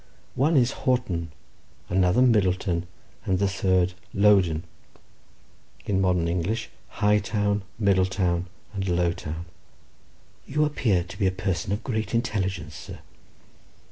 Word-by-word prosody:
One 150 +4 +2
is 125 0 +4
Houghton, 95 -11 -1 0.6
another 90 +6 +3
Middleton, 95 -6 +2 0.4
and 95 - +1
the 100 +1 +2
third 95 -2 +1 0.2
Lowdon; 95 -6 +4 1.2
in 95 -2 +1
modern 90 -3 +2
English, 90 +7 -2 0.2
Hightown, 105 0 +1 0.2
Middletown, 95 -3 +1 0.3
and 100 -1 -2
Lowtown." 85 -2 -1 1.0
"You 150 +2 +2
appear 110 -11 +1
to 95 +2 -11
be 95 - +3
a - - +2
person 95 -1 -2
of 105 +3 -2
great 110 -2 -2
intelligence, 95 -9 -1
sir." - - -9
95 Hz, 110 wpm, -25 LUFS, 90-105 Hz, 1.2 s, is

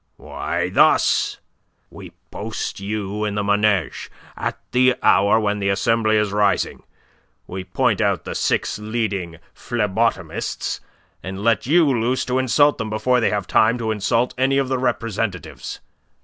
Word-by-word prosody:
"Why, - - -3
thus: - - +3 0.5
We - - -11 0.2
post - - -5
you 105 +1 -3
in 105 -1 -2
the 105 - -1
Manege, 100 -3 +1 0.3
at - - -3
the 130 0 +4
hour 100 +3 +4
when 105 -1 -1
the 100 -1 0
Assembly 110 +2 +2
is 105 -2 +1
rising. 105 -1 +1 0.6
We 95 +1 -6
point 115 +3 0
out 100 -6 +1
the - - -4
six - - -1
leading 105 -6 -3 0.2
phlebotomists, 115 -1 -2 0.4
and 95 +2 -6
let 115 +3 +2
you 165 +3 +5
loose 125 -2 0
to 125 +1 0
insult 145 +3 +3
them 110 -1 -3
before 125 +4 +1
they 115 - +2
have 100 -2 -2
time 110 +5 +3
to 115 -2 -2
insult 115 +4 0
any 135 +1 +2
of 135 -2 0
the 130 -1 0
representatives. 115 -7 -3
110 Hz, 150 wpm, -21 LUFS, 100-125 Hz, 0.6 s, you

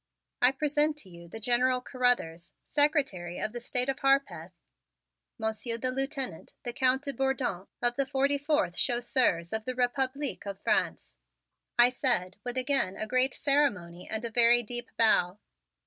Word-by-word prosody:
"I 250 - +6
present 295 +2 0
to 210 -10 -13
you 170 0 -13
the 225 +6 -9
General 250 +3 +1
Carruthers, 245 -11 -1
Secretary 275 - 0
of 215 - -3
the 240 - -6
State 250 +1 -1
of 270 0 -2
Harpeth, 240 - 0 0.9
Monsieur 220 +1 -2
the 255 +2 -2
Lieutenant, 270 - -4
the 240 - -5
Count 260 +2 +1
de 280 -1 -4
Bourdon 265 -8 -2 0.2
of 240 0 +2
the 275 -1 0
forty 280 +1 +1
fourth 290 - 0
Chasseurs 240 -8 +1
of 220 0 -3
the 255 - -3
Republique 260 0 -1
of 195 -1 -6
France." 65 -1 -1 0.6
I 240 +1 +7
said 235 -8 0
with 245 +1 -3
again 255 -7 +1
a - - -3
great 255 +4 +2
ceremony 205 - 0
and 220 +2 -3
a 230 - -5
very 240 +1 +6
deep 240 +1 -5
bow. 200 -5 +3
245 Hz, 160 wpm, -28 LUFS, 215-270 Hz, 0.9 s, I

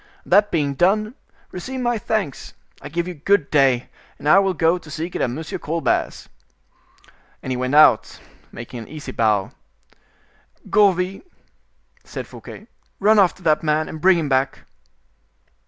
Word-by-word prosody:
That 205 +3 +4
being 145 -4 0
done, 210 - +1 0.4
receive 255 +9 -6
my 240 -2 0
thanks. 210 -11 -3 0.3
I - - -8
give 170 +3 -2
you 180 - -5
good 165 0 0
day, 135 -4 +2 0.3
and - - -13 0.2
will 190 -1 -1
go 165 +2 +3
and 180 - -5
seek 165 +4 -5
it - - -2
at - - +1
M. 140 +7 -5 0.2
Colbert's." 165 +2 -2 1.2
And 130 - -4
he - - -1
went 130 +3 -2
out, 150 -7 +5 0.3
making 120 +1 -9
an 115 - -9
easy 150 -3 -8
bow. 105 -5 0 1.2
"Gourville," 195 -2 +2 0.8
said - - -7
Fouquet, - - -12 0.3
"run 215 +2 +4
after 190 -1 +2
that 155 -2 +2
man 155 0 0
and 155 - -8
bring 185 -1 +5
him 160 -3 -2
back." 135 0 0
160 Hz, 150 wpm, -21 LUFS, 140-190 Hz, 1.2 s, out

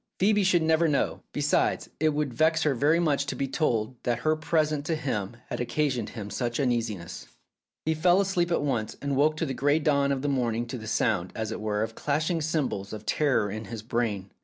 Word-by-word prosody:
Phoebe 205 +1 +3
should 180 -3 +3
never 160 +1 +3
know. 145 -3 0
Be 145 - -3
sides, 145 - +1
it 155 +1 +3
would 150 -3 -1
vex 160 +5 +3
her 150 - +2
very 145 +7 +3
much 145 -4 +1
to - - -2
be 135 - -1
told 125 -5 0
that 120 -2 0
her 155 0 +4
present 155 -2 0
to 165 - +1
him 120 -8 -3
had - - -3
occasioned 125 -2 -1
him 105 -2 -6
such 120 +3 -2
uneasiness. 115 -9 -2 0.6
He 160 - +2
fell 175 +4 +4
asleep 185 -3 +1
at 170 - +1
once, 120 -7 -2
and 140 -1 -2
woke 155 +3 +2
in - - -1
the 135 - -2
grey 145 +4 +2
dawn 140 -3 +2
of 135 -1 -1
the - - 0
morning 120 -4 0
to 125 - -4
the 110 - -8
sound, 100 -5 0
as 110 0 -3
it 110 - -5
were, 105 0 0
of 115 0 -4
clashing 155 +6 -1
cymbals 150 -11 -2
of 110 0 -7
terror 130 -7 +1
in 110 +2 -5
his 115 -3 -7
brain. 110 -5 -2
140 Hz, 220 wpm, -27 LUFS, 115-155 Hz, 0.6 s, her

